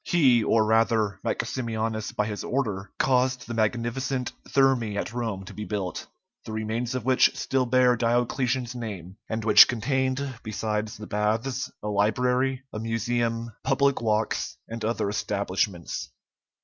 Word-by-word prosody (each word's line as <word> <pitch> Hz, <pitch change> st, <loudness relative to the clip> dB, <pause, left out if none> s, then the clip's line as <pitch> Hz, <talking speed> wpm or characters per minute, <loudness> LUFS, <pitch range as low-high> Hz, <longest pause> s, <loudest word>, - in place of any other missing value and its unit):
He, 130 Hz, -9 st, +4 dB
or 110 Hz, 0 st, +3 dB
rather 110 Hz, -2 st, +2 dB
Maximianus 110 Hz, -3 st, -2 dB
by 105 Hz, -, 0 dB
his 105 Hz, -1 st, -4 dB
order, 105 Hz, -8 st, -2 dB
caused 130 Hz, -1 st, +2 dB
the 120 Hz, -, -5 dB
magnificent 120 Hz, +4 st, -1 dB, 0.2 s
Thermæ 130 Hz, -6 st, +2 dB
at 110 Hz, -, -3 dB
Rome 110 Hz, -6 st, -3 dB
to -, -, -10 dB
be 105 Hz, -, -6 dB
built, 100 Hz, -5 st, -4 dB, 0.4 s
the -, -, -8 dB
remains 110 Hz, +3 st, -2 dB
of 125 Hz, -3 st, -3 dB
which 130 Hz, -1 st, +4 dB
still 130 Hz, -2 st, 0 dB
bear 125 Hz, 0 st, +4 dB
Diocletian's 120 Hz, +1 st, 0 dB
name, 100 Hz, -6 st, -7 dB
and 110 Hz, 0 st, -3 dB
which 105 Hz, -, +9 dB
contained, 130 Hz, +1 st, -1 dB
besides 110 Hz, -1 st, -3 dB
the 105 Hz, -, -8 dB
baths, 110 Hz, +6 st, -1 dB
a -, -, -3 dB
library, 125 Hz, +6 st, +1 dB
a 105 Hz, -, -4 dB
museum, 115 Hz, +1 st, -1 dB
public 140 Hz, -2 st, +2 dB
walks, 110 Hz, -1 st, 0 dB
and 115 Hz, 0 st, -6 dB
other 115 Hz, -1 st, 0 dB
establishments. 100 Hz, -3 st, -2 dB
115 Hz, 140 wpm, -26 LUFS, 105-125 Hz, 0.4 s, which